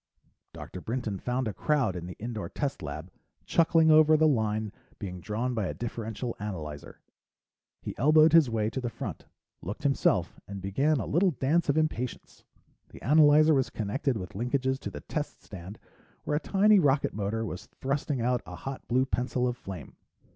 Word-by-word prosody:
Dr. 90 - -9
Brinton 110 -4 -3
found 125 +3 -1
a 105 - -3
crowd 135 - +1
in 85 -1 -5
the 90 - -8
indoor 110 -1 -5
test 140 -2 -3
lab, 75 +4 -6 0.3
chuckling 165 -1 +4
over 155 0 +7
the 155 +1 +4
line 110 -5 0 0.3
being 90 -4 -6
drawn 115 +6 -2
by 110 -5 -1
a - - -4
differential 115 0 -4
analyzer. 80 -8 -6 0.8
He - - -5
elbowed 155 +3 +6
his 160 -6 +6
way 110 -1 0
to 130 - -3
the 120 - -2
front, - - -7 0.4
looked 100 +8 -6
himself, 135 - +1
and 100 0 -6
began 135 +11 +1
a - - -2
little 185 +5 +3
dance 160 +1 +1
of 145 - +2
impatience. 140 -6 -2 0.5
The - - -13
analyzer 150 +2 +6
was 135 -3 +2
connected 115 +4 -1
with 90 -3 -7
linkages 130 +4 -1
to - - -5
the - - -8
test 150 -2 -5
stand 95 +2 -9 0.5
where 150 - 0
a - - 0
tiny 205 +4 +4
rocket 140 -4 +2
motor 110 +2 -2
was 90 -4 -6
thrusting 135 -1 -2
out 125 +1 +1
a - - -7
hot 135 -1 -7
blue 130 +2 +2
pencil 125 -1 -1
of 125 - -1
flame. 95 - -9
125 Hz, 175 wpm, -28 LUFS, 105-145 Hz, 0.8 s, over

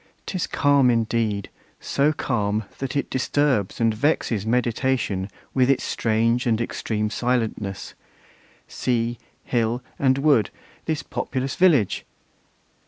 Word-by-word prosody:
'Tis 185 -3 -2
calm 140 -3 +3
indeed! 115 -3 0 0.3
so 140 +2 +1
calm, 110 -7 -1 0.2
that 135 +1 -4
it 140 - 0
disturbs 130 -5 0
And 115 -1 +3
vexes 110 -4 0
meditation 120 -4 0 0.2
with 130 -1 +3
its 135 -2 +2
strange 115 +3 +1
And 115 -2 +2
extreme 105 -2 -2
silentness. 110 -5 -2 0.7
Sea, 120 -1 -1 0.2
hill, 120 0 0 0.2
and 130 -1 +3
wood, 135 -7 +3 0.4
This 160 -2 -1
populous 130 0 -3
village! 160 - +3
120 Hz, 110 wpm, -23 LUFS, 110-135 Hz, 0.7 s, calm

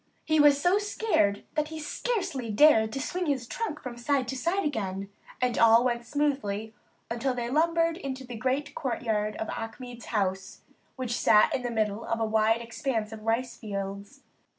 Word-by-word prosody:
He 315 0 +2
was 290 -1 +6
so 355 +6 +3
scared 410 - +1
that 305 -1 0
he 315 0 -7
scarcely 310 - -2
dared 220 -2 +5
to 270 - -2
swing 355 +5 -2
his 270 -4 0
trunk 330 - -4
from 245 -2 -6
side 255 +2 0
to 265 - -2
side 340 +8 0
again; 195 -7 -3 0.3
and 250 -2 0
all 230 +1 +7
went 235 -1 -1
smoothly 225 -8 -1 0.4
until 250 +2 -1
they 240 -1 -3
lumbered 330 +2 +2
into 265 -6 -5
the 245 - -8
great 260 +5 -1
courtyard 220 -6 -1
of 220 - -4
Achmed's 240 +2 -7
house, 190 -3 -2 0.3
which 250 -2 -2
sat 215 -3 +5
in 260 - 0
the 245 - -2
midst 220 -3 +1
of 230 +2 -3
a 225 - +1
wide 220 +1 +2
expanse 230 -2 -2
of 220 -1 -8
rice 230 +3 -1
fields. 200 +5 -6
245 Hz, 175 wpm, -28 LUFS, 220-290 Hz, 0.4 s, all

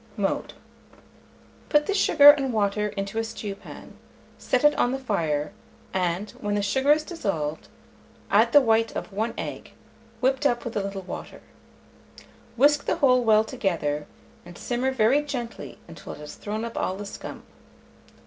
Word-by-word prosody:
Mode. - - -2 1.2
Put 295 -1 +3
the 405 - -1
sugar 290 -7 +8
and 275 -3 -1
water 210 -1 0
into 200 +1 -4
a - - 0
stewpan; 210 -3 -8 0.5
set 255 - 0
it 295 0 +6
on 245 - +1
the - - -1
fire, 160 - -2 0.4
and, 185 +2 -1
when 205 -1 -1
the 205 - 0
sugar 265 +8 +2
is 300 +1 +4
dissolved, 165 - -3 0.6
add - - +4
the 290 - +7
white 225 -2 +2
of - - -6
the 220 +4 -2
egg, - - -6 0.5
whipped 265 +2 +2
up 240 -2 -2
with 235 - -5
a 205 - +1
little 195 -1 -5
water. - - -8 1.2
Whisk 290 +3 +4
the - - +1
whole 255 -6 +3
well 215 -1 +5
together, 170 - -2 0.4
and 175 0 -12
simmer 245 +2 -1
very 260 +2 +3
gently 250 -6 -6
until 165 -1 -9
it - - -12
has 150 0 -9
thrown 215 +2 -5
up 230 - -7
all 185 - -1
the 205 - -6
scum. 200 - -8
225 Hz, 160 wpm, -25 LUFS, 195-265 Hz, 1.2 s, sugar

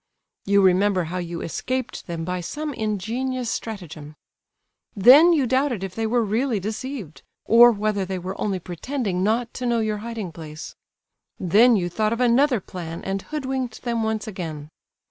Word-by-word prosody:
You 200 0 +4
remember 190 0 +3
how 175 +3 -4
you 170 -1 -5
escaped 255 +8 -4
them 165 -2 -4
by 180 0 -3
some 295 - -4
ingenious 230 +3 -2
stratagem; 160 -9 -6 0.8
then 265 - +8
you 300 -6 +3
doubted 260 -4 0
if 190 -2 -5
they 225 +2 -2
were 235 +1 +2
really 225 +2 0
deceived, 215 - -6 0.2
or 240 +1 +8
whether 210 -2 -1
they 190 0 -4
were 185 +2 -6
only 200 -3 0
pretending 185 - -3
not 225 +4 0
to 250 - -3
know 235 -1 +2
your 215 -1 -1
hiding 220 -4 -5
place; 155 -2 -9 0.6
then 220 +7 +5
you 180 -4 0
thought 215 +5 0
of 230 - -4
another 250 +1 +3
plan 170 -3 -7
and 195 0 -2
hoodwinked 265 -5 -4
them 235 -2 -1
once 220 -1 -1
again. 160 -7 -6
215 Hz, 165 wpm, -23 LUFS, 185-245 Hz, 0.8 s, then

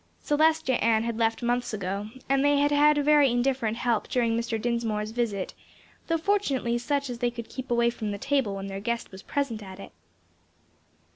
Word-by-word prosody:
Celestia 310 -3 +2
Ann 225 -1 +3
had 230 -1 -3
left 225 +1 +1
months 245 -1 0
ago, 200 +1 -4 0.2
and 275 0 +2
they 290 0 +4
had 290 +1 +2
had 295 +1 +5
very 295 -2 +5
indifferent 245 -2 0
help 240 -3 0
during 235 -2 +1
Mr. 230 -1 -2
Dinsmore's 220 -2 -1
visit, 220 -5 -2 0.5
though 330 - +1
fortunately 280 -10 0
such 280 +3 -1
as 245 -2 -6
they 245 - +1
could 235 -1 -8
keep 260 0 -7
away 235 0 +3
from 220 -3 -4
the 205 - -3
table 270 -4 0
when 195 0 -5
their 195 0 -5
guest 235 +2 -3
was 190 0 -10
present 260 -5 -2
at 190 -1 -10
it. - - -10
235 Hz, 190 wpm, -27 LUFS, 220-275 Hz, 0.5 s, had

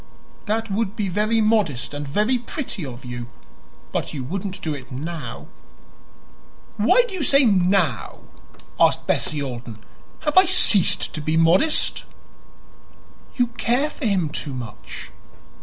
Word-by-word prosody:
"That 225 0 -1
would 210 0 -1
be 205 -4 -2
very 215 +4 +1
modest 210 - +1
and 145 0 -5
very 215 - +1
pretty 235 - -5
of 130 -1 -8
you; 120 -1 -6 0.6
but - - -3
you 135 - -4
wouldn't 190 +6 -4
do 155 - -1
it 135 -2 -9
now." 155 +5 -6 1.3
"Why - - +5
do 420 - -9
you 370 - -3
say 275 -1 +4
'now'?" 185 - +1 0.6
asked - - +3
Bessie 150 -2 0
Alden. 120 -4 -6 0.4
"Have 310 +4 +5
I 375 - +5
ceased 230 - +4
to 155 - -4
be 155 +2 0
modest?" 175 - +3 1.3
"You 245 - +3 0.2
care 270 +6 +1
for 285 - -6
him 185 -7 +1
too 145 -2 -5
much. 120 -4 -8
190 Hz, 140 wpm, -22 LUFS, 145-225 Hz, 1.3 s, Why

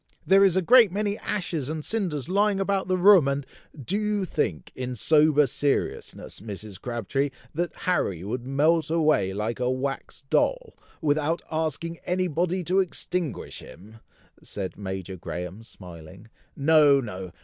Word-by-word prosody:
There 195 +1 +6
is 190 -3 +4
a 190 - +2
great 235 0 +6
many 205 +1 -1
ashes 170 -8 -3
and 155 -1 -4
cinders 175 - -2
lying 200 +2 +2
about 195 -1 0
the 185 0 +1
room, 185 -5 +6
and 140 0 -1 0.2
" 140 -5 -13
"Do 200 +3 +1
you 210 -2 0
think, 95 - -2
in 125 -1 -5
sober 150 +4 +4
seriousness, 140 +2 -2
Mrs. 105 -2 -8
Crabtree, 125 +4 -2 0.2
that 175 +2 -2
Harry 100 - 0
would 120 +5 -4
melt 155 +5 +2
away 155 - +2
like 105 +5 -3
a 125 0 0
wax 135 +2 -4
doll, - - +1 0.3
without 155 +2 +1
asking 160 +1 -2
any 185 +1 0
body 180 +3 -1
to 185 +3 +2
extinguish 180 -3 -3
him?" 110 +4 -13 0.4
said 95 -3 -6
Major 95 -1 -6
Graham, 90 +4 -6
smiling. 90 -2 -12 0.3
"No! 145 -1 +5
no! 95 -7 -6
150 Hz, 150 wpm, -25 LUFS, 115-180 Hz, 0.4 s, There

